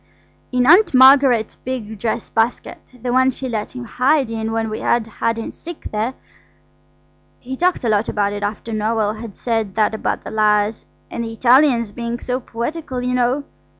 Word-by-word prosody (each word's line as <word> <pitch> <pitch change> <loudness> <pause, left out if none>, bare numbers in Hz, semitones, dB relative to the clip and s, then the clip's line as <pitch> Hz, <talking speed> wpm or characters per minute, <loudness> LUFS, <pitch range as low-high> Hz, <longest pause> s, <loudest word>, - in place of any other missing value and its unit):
"In 250 -1 +2
Aunt 345 +2 +6
Margaret's 260 -4 +5
big 220 -5 -6
dress 225 0 -2
basket–the 245 +1 -3
one 260 +1 +4
she 260 +1 -5
let 220 -1 -4
him 250 - -5
hide 260 +2 +1
in 225 0 -3
when 225 0 -1
we 215 0 -4
had 235 -2 +1
hide 230 +1 -2
and 225 - -5
seek 345 -1 -9
there. 220 +5 -2 1.2
He 260 +1 -6
talked 355 +2 0
a 235 - +1
lot 210 0 +1
about 205 -1 0
it 205 - -5
after 210 +2 -4
Noël 215 0 -1
had 225 -4 -8
said 225 -5 -2
that 215 0 +2
about 220 - -2
the - - -7
lyres–and 215 +2 -1
the 225 - -5
Italians 245 -1 +4
being 235 +2 -4
so 250 0 -2
poetical, 260 +3 -5
you 250 0 -1
know. 250 +3 +1
235 Hz, 175 wpm, -19 LUFS, 220-255 Hz, 1.2 s, Aunt